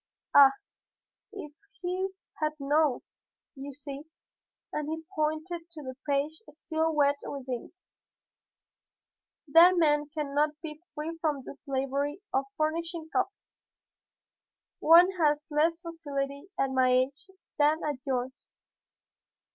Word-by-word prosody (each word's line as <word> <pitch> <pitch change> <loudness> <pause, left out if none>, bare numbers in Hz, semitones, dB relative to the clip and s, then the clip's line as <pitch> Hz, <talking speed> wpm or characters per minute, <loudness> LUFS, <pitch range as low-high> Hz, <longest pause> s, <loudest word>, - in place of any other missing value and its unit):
Ah! 275 -1 +9 0.8
if 345 -8 -8 0.3
he 370 +2 -2 0.3
had 305 0 +1
known! 285 -1 +2 0.5
"You 275 +1 -7
see," 280 +1 -8 0.7
and 300 0 -2
he 320 0 -4
pointed 315 +2 -2
to 320 -3 -10
the 260 -1 -6
page 285 +3 0
still 320 +1 -1
wet 285 -1 +3
with 275 -2 -6
ink, 250 -2 -4 1.8
"that 340 +5 +7
man 295 -3 +3
cannot 300 0 0
be 305 -1 -7
free 325 +2 -5
from 295 -4 0
the - - -8
slavery 280 +2 -2
of 270 +1 +1
furnishing 325 +1 -2
copy. - - +2 1.5
One 345 +4 +7
has 300 -1 +2
less 325 +3 +2
facility 285 -3 -4
at 270 -1 +1
my 260 -1 +3
age 270 +7 +1 0.3
than 300 +2 +3
at 295 -3 -1
yours. 260 0 -4
300 Hz, 115 wpm, -29 LUFS, 280-320 Hz, 1.8 s, Ah